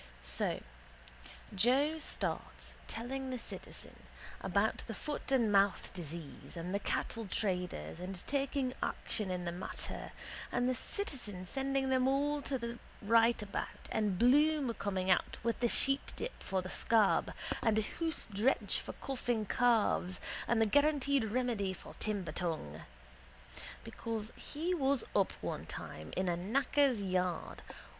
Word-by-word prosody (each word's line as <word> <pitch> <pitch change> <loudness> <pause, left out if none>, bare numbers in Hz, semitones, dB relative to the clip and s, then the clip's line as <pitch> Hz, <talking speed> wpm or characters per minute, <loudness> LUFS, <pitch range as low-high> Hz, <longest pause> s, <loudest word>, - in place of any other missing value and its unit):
So - - 0 0.9
Joe 265 +10 +3
starts - - -2
telling 260 +3 -3
the 255 - -2
citizen - - -5 0.5
about - - +2
the - - -4
foot 295 -2 -4
and 235 -5 +4
mouth 200 -1 +3
disease 170 -2 -7
and 175 +3 -3
the 200 - +2
cattle 225 +1 -1
traders 180 - -2
and 180 0 -5
taking 275 -2 0
action 210 -3 0
in 180 -1 -2
the 170 - -1
matter 175 +2 -3 0.4
and 245 0 +2
the 255 - +3
citizen 245 - -2
sending 270 +4 0
them 260 0 +3
all 290 +2 +2
to 275 -1 -1
the 235 0 -5 0.2
rightabout 225 -1 +2
and 210 -4 +1
Bloom 280 - +4
coming 190 -3 0
out 180 - +2
with 230 0 0
his 240 - +3
sheepdip 275 - 0
for 190 -1 -1
the 185 - -6
scab 220 -3 +3 0.3
and 225 -2 +3
a 220 - +3
hoose 325 +8 -2
drench 220 +7 +2
for - - -7
coughing 240 -5 -1
calves 215 -6 +2 0.3
and 235 - +3
the 225 - +5
guaranteed 280 +1 +3
remedy 220 -4 0
for - - -11
timber 200 -7 -1
tongue. 155 - -2 1.0
Because 225 -1 -4
he 330 +5 -2
was 275 -6 +2
up 195 - +3
one - - -4
time 75 0 -7
in 185 0 +1
a 175 - +2
knacker's 255 +4 +2
yard. 180 -2 -1
230 Hz, 140 wpm, -34 LUFS, 190-270 Hz, 1.0 s, the